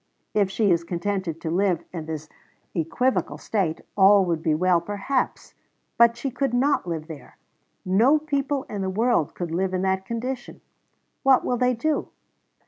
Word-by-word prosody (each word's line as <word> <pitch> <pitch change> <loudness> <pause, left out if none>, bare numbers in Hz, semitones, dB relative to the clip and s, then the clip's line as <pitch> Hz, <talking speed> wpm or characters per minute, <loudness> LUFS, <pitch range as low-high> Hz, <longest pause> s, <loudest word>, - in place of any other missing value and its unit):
If 200 -3 +2
she 200 0 +1
is 170 -1 +2
contented 175 -1 -3
to 160 - -3
live 185 0 +1
in 160 -3 -6
this 155 -1 -5 0.5
equivocal 170 +11 0
state, 185 -7 -1
all 195 0 +6
would 165 -3 -1
be 160 -2 +1
well 180 +1 +3
perhaps; 205 +8 -2 0.4
but 235 0 +5
she 265 +2 -3
could 250 0 -1
not 270 -5 +2
live 160 -2 -3
there. 160 -3 -11 0.5
No 225 +11 +4
people 285 -2 -1
in 210 -9 -6
the 190 - -1
world 220 - +1
could 175 -2 -4
live 185 +2 -1
in 185 - -1
that 190 0 0
condition. 245 +2 -5 0.6
What 270 -2 +4
will 250 - 0
they 250 0 +2
do? 305 +6 -1
195 Hz, 165 wpm, -24 LUFS, 170-250 Hz, 0.6 s, all